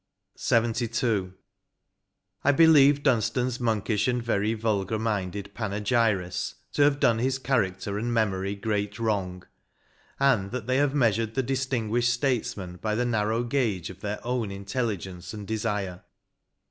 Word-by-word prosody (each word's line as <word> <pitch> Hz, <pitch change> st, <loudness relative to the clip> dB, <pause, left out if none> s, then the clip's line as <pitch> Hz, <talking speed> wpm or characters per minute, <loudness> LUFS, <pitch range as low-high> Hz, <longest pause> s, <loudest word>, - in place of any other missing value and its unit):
144 115 Hz, +1 st, +1 dB
LXXII. 95 Hz, -4 st, -1 dB, 0.6 s
" -, -, -50 dB
I 145 Hz, -, +6 dB
BELIEVE 145 Hz, -2 st, +6 dB
Dunstan's 125 Hz, 0 st, +1 dB
monkish 110 Hz, -2 st, 0 dB
and 125 Hz, -1 st, 0 dB
very 110 Hz, -1 st, 0 dB
vulgar 110 Hz, -1 st, -1 dB
minded 100 Hz, -3 st, -3 dB
panegyrists 105 Hz, -3 st, 0 dB, 0.2 s
to -, -, +1 dB
have 145 Hz, 0 st, +4 dB
done 115 Hz, -4 st, +3 dB
his 130 Hz, +2 st, 0 dB
character 100 Hz, -6 st, -1 dB
and 120 Hz, +2 st, -2 dB
memory 100 Hz, -3 st, 0 dB
great 105 Hz, -1 st, -2 dB
wrong; 95 Hz, -5 st, -2 dB, 0.8 s
and 125 Hz, -8 st, +3 dB
that 120 Hz, 0 st, -5 dB
they 130 Hz, +2 st, +1 dB
have 145 Hz, 0 st, +2 dB
measured 115 Hz, -4 st, +1 dB
the 135 Hz, -, +1 dB
distinguished 120 Hz, -3 st, 0 dB
statesman 115 Hz, -8 st, -2 dB
hy 105 Hz, -1 st, -1 dB
the 120 Hz, +2 st, 0 dB
narrow 110 Hz, 0 st, 0 dB
gauge 115 Hz, -, -1 dB
of 95 Hz, -, -14 dB
their 105 Hz, +1 st, -3 dB
own 120 Hz, -3 st, -1 dB
intelligence 100 Hz, -3 st, -4 dB
and 105 Hz, -2 st, -8 dB
desire. 105 Hz, -5 st, -2 dB
110 Hz, 140 wpm, -26 LUFS, 100-125 Hz, 0.8 s, I